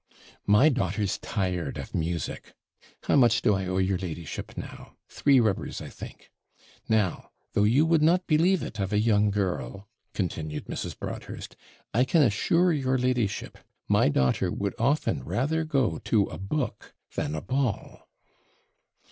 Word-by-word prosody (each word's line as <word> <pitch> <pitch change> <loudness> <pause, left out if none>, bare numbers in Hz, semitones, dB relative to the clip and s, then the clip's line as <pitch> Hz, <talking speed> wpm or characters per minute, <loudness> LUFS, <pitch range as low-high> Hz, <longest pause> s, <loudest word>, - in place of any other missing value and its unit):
'My 105 +9 +6
daughter's 105 - -1
tired 90 -7 -2
of - - -7
music. 85 -2 -3 0.5
How - - +2
much 120 -5 +4
do 110 - +4
I 95 -1 -1
owe 95 0 -1
your 95 -1 +1
ladyship 85 -4 -6
now? - - -9
three 140 -2 +3
rubbers, 110 -5 0
I - - -8
think. - - -11 0.6
Now, 105 -6 +1 0.2
though 105 - +3
you 130 +9 +4
would 160 -1 +3
not 175 +4 +3
believe 170 +3 +3
it 110 - -7
of 95 0 -1
a 105 - +2
young 105 -1 +3
girl,' 95 - -3 0.3
continued 80 -5 -3
Mrs. - - -5
Broadhurst, - - -7 0.4
'I 125 +4 +3
can 165 +1 +4
assure 165 - +3
your 130 -3 +1
ladyship, 125 -5 -1 0.3
my - - +4
daughter 65 -2 +1
would 100 -1 -2
often 140 +7 +1
rather 160 +6 0
go 140 -6 0
to 105 -3 +2
a - - -8
book 115 +5 -4 0.2
than 75 - -2
a 80 - -3
ball.' 130 0 -3
110 Hz, 150 wpm, -27 LUFS, 95-135 Hz, 0.6 s, My